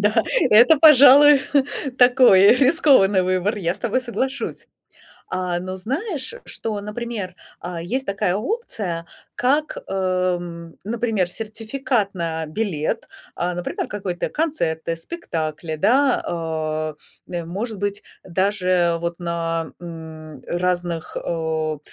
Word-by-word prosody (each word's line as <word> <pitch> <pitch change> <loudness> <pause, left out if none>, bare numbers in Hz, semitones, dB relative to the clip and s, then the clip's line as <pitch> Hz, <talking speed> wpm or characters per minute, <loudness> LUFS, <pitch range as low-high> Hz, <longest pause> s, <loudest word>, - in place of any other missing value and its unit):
да, 210 +1 +3 0.3
это, 245 +9 +7
пожалуй, 285 -1 +8 0.6
такой, 245 -5 +6
э, 200 +4 +7
рискованный 260 - +4
выбор, 185 +3 0
я 175 -3 -1
с - - -11
тобой 235 +4 0
соглашусь. 260 +2 -3 0.6
А, 180 -1 -2
но 185 +1 -6
знаешь, 290 - -3
что, 215 -2 -4
например, 210 -3 -5 0.2
а, 175 -1 -6
есть 250 +10 -2
такая 195 -2 0
опция, 210 - -3 0.3
как, 290 +5 +1
эм, 180 -3 -2
например, 220 -3 -1
сертификат 225 +2 -2
на 165 -3 -3
билет, 155 -2 -2 0.3
а, 180 +1 -2
например, 175 - -4
какой-то 190 -4 -4
концерты, 170 - -1
спектакли, 165 - -5
да. 255 - +3
А, 155 -2 -3 0.4
э, 175 -2 -3
может 205 +5 -5
быть, 205 0 -3 0.2
даже 185 -2 +1
вот 170 0 -3
на, 165 -1 -3
м, 160 -4 -10
разных, 175 -2 -2
о 160 -2 -2
185 Hz, 115 wpm, -21 LUFS, 170-235 Hz, 0.6 s, пожалуй